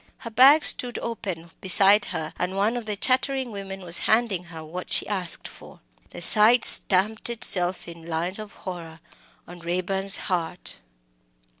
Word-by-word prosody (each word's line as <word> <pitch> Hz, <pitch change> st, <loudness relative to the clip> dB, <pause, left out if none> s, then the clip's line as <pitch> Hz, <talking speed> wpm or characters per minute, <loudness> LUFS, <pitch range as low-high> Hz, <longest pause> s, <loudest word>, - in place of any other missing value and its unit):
Her 230 Hz, -, -10 dB
bag 270 Hz, +7 st, +4 dB
stood 245 Hz, -1 st, -1 dB
open 185 Hz, -8 st, -8 dB
beside 195 Hz, +2 st, +4 dB
her, 160 Hz, -3 st, -7 dB
and 180 Hz, +1 st, -5 dB
one 210 Hz, +4 st, -1 dB
of 240 Hz, -3 st, -8 dB
the 210 Hz, -, -5 dB
chattering 260 Hz, +3 st, -1 dB
women 195 Hz, -1 st, -10 dB
was 175 Hz, -2 st, -2 dB
handing 220 Hz, -6 st, -1 dB
her 165 Hz, -2 st, -12 dB
what 180 Hz, +4 st, -10 dB
she -, -, 0 dB
asked 185 Hz, -5 st, -6 dB
for. -, -, -17 dB, 0.3 s
The -, -, -9 dB
sight 220 Hz, +6 st, +6 dB
stamped 210 Hz, +5 st, +6 dB
itself 185 Hz, -7 st, 0 dB
in 170 Hz, -1 st, -13 dB
lines 170 Hz, +4 st, -5 dB
of 215 Hz, -1 st, -11 dB
horror 170 Hz, -3 st, -11 dB, 0.5 s
on 175 Hz, 0 st, -14 dB
Raeburn's 185 Hz, +3 st, -2 dB
heart. 175 Hz, -2 st, -4 dB
195 Hz, 155 wpm, -22 LUFS, 175-220 Hz, 0.5 s, sight